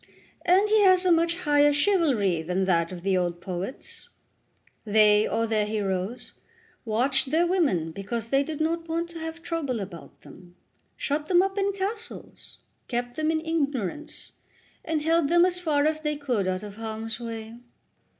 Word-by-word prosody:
And 380 Hz, +4 st, +4 dB
he 430 Hz, 0 st, +4 dB
has 370 Hz, -2 st, +5 dB
a 360 Hz, -, +4 dB
much 335 Hz, 0 st, +3 dB
higher 290 Hz, -2 st, +4 dB
chivalry 285 Hz, -, +2 dB
than 180 Hz, +4 st, -1 dB
that 170 Hz, -2 st, +1 dB
of 175 Hz, -1 st, -8 dB
the 195 Hz, -1 st, +1 dB
old 175 Hz, -1 st, -1 dB
poets. 185 Hz, +7 st, -6 dB, 0.7 s
They, 210 Hz, 0 st, +4 dB
or 230 Hz, -, 0 dB
their 215 Hz, -2 st, 0 dB
heroes, 200 Hz, +1 st, -3 dB, 0.5 s
watched 260 Hz, +5 st, +1 dB
their 325 Hz, +4 st, +3 dB
women 290 Hz, -, +1 dB
because 210 Hz, +5 st, -4 dB
they 275 Hz, +2 st, +3 dB
did 300 Hz, +1 st, -4 dB
not 330 Hz, +1 st, -1 dB
want 335 Hz, +1 st, -1 dB
to 335 Hz, -, -8 dB
have 325 Hz, +1 st, -6 dB
trouble 285 Hz, -8 st, -2 dB
about 190 Hz, -4 st, -9 dB
them, 175 Hz, -1 st, -15 dB, 0.4 s
shut 295 Hz, +1 st, -2 dB
them 360 Hz, 0 st, +5 dB
up 390 Hz, 0 st, -2 dB
in 400 Hz, 0 st, +1 dB
castles, 400 Hz, +3 st, -6 dB, 0.3 s
kept 245 Hz, 0 st, -3 dB
them 310 Hz, 0 st, 0 dB
in 320 Hz, 0 st, -1 dB
ignorance, 295 Hz, -, -3 dB, 0.5 s
and 315 Hz, -2 st, -1 dB
held 325 Hz, -2 st, +2 dB
them 345 Hz, +1 st, +5 dB
as 360 Hz, -1 st, 0 dB
far 300 Hz, -4 st, +1 dB
as 310 Hz, 0 st, 0 dB
they 300 Hz, -1 st, -2 dB
could 245 Hz, -9 st, -1 dB
out 185 Hz, +1 st, -2 dB
of 205 Hz, 0 st, -9 dB
harm's 225 Hz, +1 st, -5 dB
way." 230 Hz, 0 st, -7 dB
280 Hz, 170 wpm, -26 LUFS, 210-330 Hz, 0.7 s, has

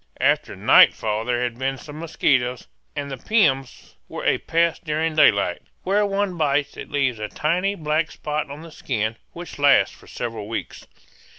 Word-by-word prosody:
After -, -, +1 dB
nightfall 110 Hz, 0 st, +4 dB
there 120 Hz, 0 st, 0 dB
had 120 Hz, -1 st, -3 dB
been 135 Hz, 0 st, -1 dB
some 145 Hz, +3 st, -10 dB
mosquitoes, 130 Hz, -6 st, 0 dB, 0.3 s
and 140 Hz, -1 st, -4 dB
the 135 Hz, -, -5 dB
piums 135 Hz, -, 0 dB, 0.2 s
were -, -, -6 dB
a -, -, +2 dB
pest 170 Hz, +1 st, 0 dB
during 155 Hz, 0 st, -1 dB
daylight; 100 Hz, -, +3 dB, 0.2 s
where 200 Hz, +2 st, +2 dB
one 195 Hz, -2 st, -1 dB
bites 145 Hz, -2 st, 0 dB
it -, -, -8 dB
leaves 130 Hz, -5 st, 0 dB
a 105 Hz, -, -3 dB
tiny 180 Hz, -, 0 dB
black 155 Hz, -1 st, -1 dB
spot 150 Hz, -1 st, -4 dB
on 145 Hz, +3 st, -8 dB
the 165 Hz, -, -11 dB
skin 110 Hz, -6 st, -2 dB, 0.2 s
which 175 Hz, -3 st, -9 dB
lasts 140 Hz, -1 st, +4 dB
for -, -, -19 dB
several 115 Hz, -3 st, -5 dB
weeks. 115 Hz, -, -6 dB
145 Hz, 170 wpm, -22 LUFS, 125-165 Hz, 0.3 s, nightfall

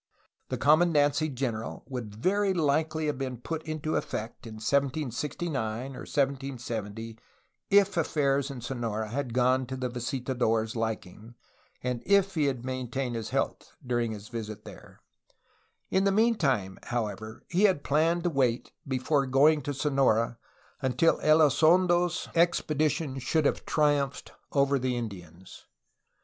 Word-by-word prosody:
The -, -, -2 dB
commandancy 150 Hz, -1 st, +3 dB
general 120 Hz, -4 st, -3 dB
would 120 Hz, -6 st, -6 dB
very 195 Hz, -, +1 dB
likely 155 Hz, 0 st, +1 dB
have 145 Hz, -3 st, -2 dB
been 130 Hz, -2 st, -3 dB
put 160 Hz, +7 st, -4 dB
into 155 Hz, 0 st, -2 dB
effect 115 Hz, +2 st, -4 dB
in 110 Hz, -, -8 dB
1769 135 Hz, 0 st, -2 dB
or -, -, -8 dB
1770 120 Hz, -6 st, -3 dB, 0.5 s
if 200 Hz, 0 st, +4 dB
affairs 140 Hz, -4 st, +1 dB
in 135 Hz, -3 st, -7 dB
Sonora 115 Hz, -3 st, -3 dB
had 130 Hz, +1 st, -3 dB
gone 130 Hz, +1 st, +2 dB
to 130 Hz, -, -5 dB
the 130 Hz, -1 st, -2 dB
visitador' 120 Hz, -2 st, -1 dB
s 110 Hz, +1 st, -7 dB
liking 110 Hz, 0 st, -4 dB, 0.5 s
and 125 Hz, -2 st, -2 dB
if 200 Hz, -1 st, +4 dB
he 155 Hz, -4 st, +1 dB
had 130 Hz, -3 st, -2 dB
retained 130 Hz, 0 st, -3 dB
his 115 Hz, -2 st, -4 dB
health -, -, -2 dB
dur 120 Hz, -1 st, 0 dB
ing 115 Hz, -1 st, -1 dB
his 105 Hz, 0 st, -9 dB
visit 110 Hz, -3 st, -6 dB
there. -, -, -13 dB, 0.9 s
In 190 Hz, +1 st, +2 dB
the 195 Hz, -, +4 dB
meantime, 155 Hz, -, +1 dB
however, 110 Hz, -2 st, -4 dB
he 185 Hz, +4 st, +3 dB
had 185 Hz, -8 st, +2 dB
planned 165 Hz, +4 st, +2 dB
to 175 Hz, -, +1 dB
wait 125 Hz, -5 st, 0 dB, 0.2 s
before 135 Hz, +2 st, +1 dB
going 145 Hz, +4 st, +4 dB
to 145 Hz, -, -3 dB
Sonora 135 Hz, -5 st, +1 dB, 0.4 s
until 135 Hz, +5 st, +2 dB
Elizondo's 175 Hz, +3 st, +4 dB
expedition 155 Hz, -4 st, +1 dB
should 155 Hz, +4 st, 0 dB
have -, -, 0 dB
triumphed 145 Hz, -2 st, +1 dB, 0.2 s
over 140 Hz, -1 st, +2 dB
the 125 Hz, -1 st, -1 dB
Indians. 95 Hz, -6 st, -8 dB
135 Hz, 135 wpm, -28 LUFS, 120-155 Hz, 0.9 s, if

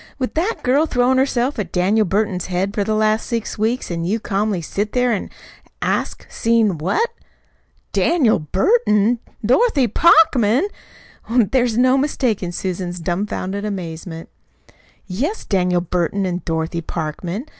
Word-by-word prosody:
With 255 Hz, -3 st, -3 dB
that 365 Hz, +8 st, -1 dB
girl 280 Hz, +6 st, +3 dB
throwin' 250 Hz, -1 st, +2 dB
herself 260 Hz, -1 st, 0 dB
at 190 Hz, -5 st, -4 dB
Daniel 200 Hz, +4 st, +2 dB
Burton's 195 Hz, -2 st, -1 dB
head 190 Hz, +2 st, -1 dB
for 205 Hz, -, 0 dB
the 215 Hz, +2 st, -1 dB
last 215 Hz, +1 st, +1 dB
six 230 Hz, -3 st, -3 dB
weeks, 225 Hz, 0 st, -1 dB
an' 170 Hz, -1 st, -2 dB
you 205 Hz, +7 st, 0 dB
calmly 205 Hz, -2 st, -1 dB
set 205 Hz, +5 st, -3 dB
there 250 Hz, -1 st, +2 dB
an' 210 Hz, -, -2 dB, 0.5 s
ask -, -, -2 dB
'seen 225 Hz, -7 st, +1 dB
what?'!" 445 Hz, -, 0 dB, 0.8 s
"Daniel 295 Hz, -10 st, +3 dB
Burton 215 Hz, -, +2 dB, 0.3 s
Dorothy 280 Hz, -, +3 dB
Parkman!" 275 Hz, -, +4 dB, 0.6 s
There 245 Hz, +2 st, +3 dB
was 235 Hz, -2 st, 0 dB
no 255 Hz, +2 st, +4 dB
mistaking 240 Hz, -10 st, -1 dB
Susan's 180 Hz, 0 st, -4 dB
dumfounded 190 Hz, +3 st, -3 dB
amazement. 165 Hz, -4 st, -6 dB, 0.8 s
"Yes, 270 Hz, -, -3 dB
Daniel 180 Hz, -3 st, +1 dB
Burton 180 Hz, +3 st, -1 dB
an' 180 Hz, 0 st, -2 dB
Dorothy 165 Hz, +1 st, -2 dB
Parkman. 170 Hz, -, -4 dB
210 Hz, 135 wpm, -20 LUFS, 180-250 Hz, 0.8 s, Parkman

